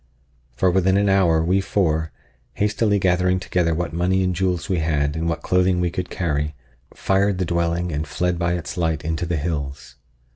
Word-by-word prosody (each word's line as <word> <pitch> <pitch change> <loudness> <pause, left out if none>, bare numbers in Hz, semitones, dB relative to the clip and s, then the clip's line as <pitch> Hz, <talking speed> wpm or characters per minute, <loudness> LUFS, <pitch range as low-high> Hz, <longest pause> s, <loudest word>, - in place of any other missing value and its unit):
For 90 +7 +2
within 95 +1 +2
an 100 0 +2
hour 85 -5 +3
we 95 +4 +2
four, 80 -5 0 0.4
hastily 105 0 +1
gathering 90 0 +2
together 90 -3 0
what 80 -2 -3
money 90 +3 +1
and 90 -1 0
jewels 90 -1 -1
we 90 -3 0
had 75 -2 0
and 80 +1 -1
what 85 - -3
clothing 90 0 +2
we 90 -1 0
could 90 0 -4
carry, 75 -3 -2 0.4
fired 95 0 +1
the 90 - -1
dwelling 85 +1 -1
and 75 +1 -3
fled 85 +3 -1
by 85 0 +1
its 85 -1 -5
light 80 -3 -1
into 80 +2 -2
the 85 -1 -1
hills. 70 -5 -4
85 Hz, 185 wpm, -22 LUFS, 80-95 Hz, 0.4 s, hour